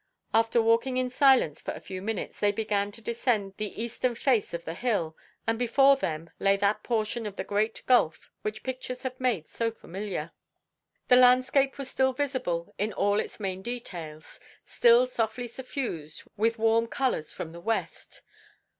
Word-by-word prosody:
After 225 +1 +3
walking 230 +3 +2
in 255 -1 0
silence 260 - +4
for - - -4
a - - -8
few 185 -1 -7
minutes, 215 0 -4
they 205 - +3
began 205 -1 -1
to 230 - -10
descend 225 -4 0
the 210 -1 -4
eastern 235 +1 -1
face 235 -3 +1
of 170 0 -5
the 165 - -4
hill, 175 -7 -1 0.3
and 225 0 0
before 270 +3 +5
them 165 - -4
lay 195 0 +3
that 200 +1 +1
portion 225 -1 -1
of 200 - -7
the - - -3
great 215 +2 -1
gulf 240 -11 +2
which 215 0 -4
pictures 255 -1 -5
have 255 -1 -5
made 235 -11 0
so 230 -1 -1
familiar. 190 -6 -6 0.8
The 250 - +7
landscape 255 +2 +4
was 275 -2 -5
still 265 0 +2
visible 255 -12 -2
in 210 +1 -1
all 205 +2 +2
its - - -5
main 190 -2 -3
details, 175 -10 -7 0.3
still 235 +1 +5
softly 240 -1 -2
suffused 235 - -5
with 225 +2 +1
warm 225 +1 +3
colours 250 - -1
from 160 - -6
the 170 +1 -10
west. 225 +5 -4
225 Hz, 170 wpm, -28 LUFS, 195-250 Hz, 0.8 s, The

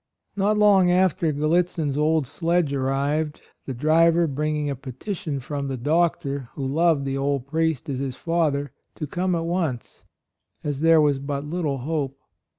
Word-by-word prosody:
Not 205 +1 +2
long 200 -4 +5
after 180 -3 +2
Gal 150 +1 -1
litzin's 165 -4 +1
old 155 0 +2
sledge 165 +1 0
arrived, 140 +3 -1 0.3
the 135 - -3
driver 165 +5 +4
bringing 150 0 -1
a 140 - -2
petition 140 - -5
from 140 +2 -4
the 135 -1 -3
doctor 140 -2 0
(who 135 - -3
loved 155 +1 +2
the 135 0 -2
old 140 -2 -1
priest 160 0 -1
as 135 -3 -3
his 135 -2 -3
father 145 -3 0
) - - -41
to 150 - -4
come 180 +4 -1
at 165 0 -2
once, 165 -8 -3 0.6
as 145 -1 -3
there 165 -1 +6
was 145 -2 +2
but 140 +1 -4
little 150 -3 -2
hope. 140 0 -3
150 Hz, 165 wpm, -24 LUFS, 140-165 Hz, 0.6 s, there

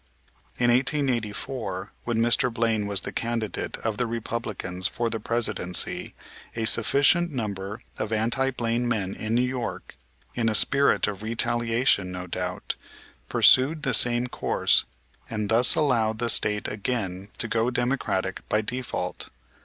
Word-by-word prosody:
In 120 0 +3
1884, 120 - -1
when 120 -1 -1
Mr. 120 +2 +3
Blaine 115 -2 0
was 100 -1 +3
the - - -6
candidate 115 -4 -3
of 110 -2 -1
the 125 - 0
Republicans 110 -5 -1
for 115 +4 -2
the 115 - -2
Presidency, 110 -5 0 0.4
a 115 -1 -1
sufficient 145 +10 +3
number 105 -3 -5 0.2
of 110 - -3
anti 115 +5 +1
Blaine 120 -1 -1
men 100 -5 -1
in 110 +1 -3
New 125 - +3
York, 125 -2 -5 0.4
in 115 -2 0
a 110 - +1
spirit 140 +5 +3
of 105 -1 -4
retaliation, 115 -2 +1
no 90 0 -5
doubt, 90 0 -4 0.6
pursued 150 +4 +4
the 135 -4 0
same 120 +1 +3
course 125 - +1 0.4
and 105 -2 -3
thus 120 +2 +5
allowed 115 -7 +2
the 120 +1 +2
State 105 0 +1
again 100 -3 -3
to 120 - -2
go 115 +1 +1
Democratic 120 -7 -1
by 105 - +2
default. 120 -6 -4
115 Hz, 140 wpm, -25 LUFS, 105-125 Hz, 0.6 s, thus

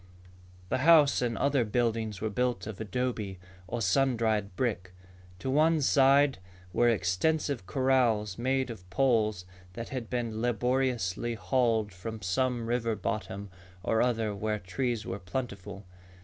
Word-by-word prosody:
The - - 0
house 150 -2 +6
and 120 -2 -1
other 140 -3 +2
buildings 110 -2 -1
were 110 0 -1
built 120 -3 -1
of 110 -1 -7
adobe, 110 -3 -2 0.3
or 115 +3 -3
sun 125 +6 +2
dried 105 -4 0
brick. 95 -7 -2 0.4
To 130 - -3
one 155 +3 +4
side 140 -2 +4 0.3
were 120 +4 +4
extensive 115 - 0
corrals 120 -5 +2
made 130 +1 0
of 90 -5 -11
poles 110 -5 +1 0.3
that 115 +4 -6
had 125 -4 -5
been 115 -3 -2
laboriously 120 -2 0
hauled 115 -3 +1
from 110 +3 -7
some 120 +6 0
river 115 -1 0
bottom 100 -2 -4 0.3
or 110 +2 +2
other 115 -4 +1
where 105 +1 -2
trees 115 +4 -2
were 95 +2 -4
plentiful. 100 -1 -6
115 Hz, 135 wpm, -29 LUFS, 105-130 Hz, 0.4 s, house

